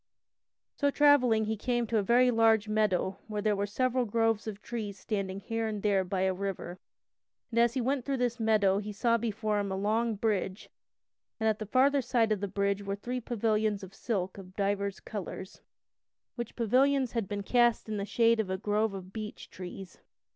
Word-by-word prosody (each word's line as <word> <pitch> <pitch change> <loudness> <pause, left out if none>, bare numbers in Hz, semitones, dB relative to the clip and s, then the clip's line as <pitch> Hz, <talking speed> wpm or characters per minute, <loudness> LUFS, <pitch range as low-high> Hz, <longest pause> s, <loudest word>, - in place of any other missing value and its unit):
So 285 - +1
travelling 265 -7 +4
he 220 +1 -1
came 240 +2 -1
to 225 0 +1
a - - +2
very 245 +5 +4
large 225 -2 +4
meadow 210 -3 0
where 210 -1 0
were 200 +1 -1
several 255 +4 0
groves 225 0 +1
of 210 -2 -5
trees 210 -3 -5
standing 195 -2 -3
here 225 +3 -2
and 210 -2 -4
there 205 -2 +3
along 185 -1 -3
by 190 -1 -1
a 190 0 +2
river. 185 -2 -5 0.7
And 235 - +1
as 235 0 +3
he 260 - +1
went 265 +1 0
through 275 +1 -1
this 245 -1 -1
meadow 210 -3 +3
he 210 0 -5
saw 230 +3 +1
before 215 -2 -1
him 200 -1 -2
a - - -1
long 220 +3 0
bridge, 200 -2 -2 0.7
and 220 - +1
at 215 -1 +1
the 215 - -5
farther 275 +5 +3
side 235 -3 +1
of 210 - +1
the 200 - -2
bridge 200 +1 0
were 200 0 -3
three 245 +5 -4
pavilions 215 -3 0
of 190 0 -10
silk 195 -4 -3
of 185 -1 -12
divers 200 -1 -1
colors, 190 -3 -7 0.7
which 240 -2 -6
pavilions 260 +3 +2
had 230 -5 -2
been 200 0 -4
cast 240 +1 +2
in 215 -1 -3
the 200 - -2
shade 230 +1 +3
of 210 -4 -1
a 190 - -1
grove 210 +1 0
of 190 0 -9
beech 215 -1 -7
trees. 185 0 -9
215 Hz, 200 wpm, -30 LUFS, 200-235 Hz, 0.7 s, travelling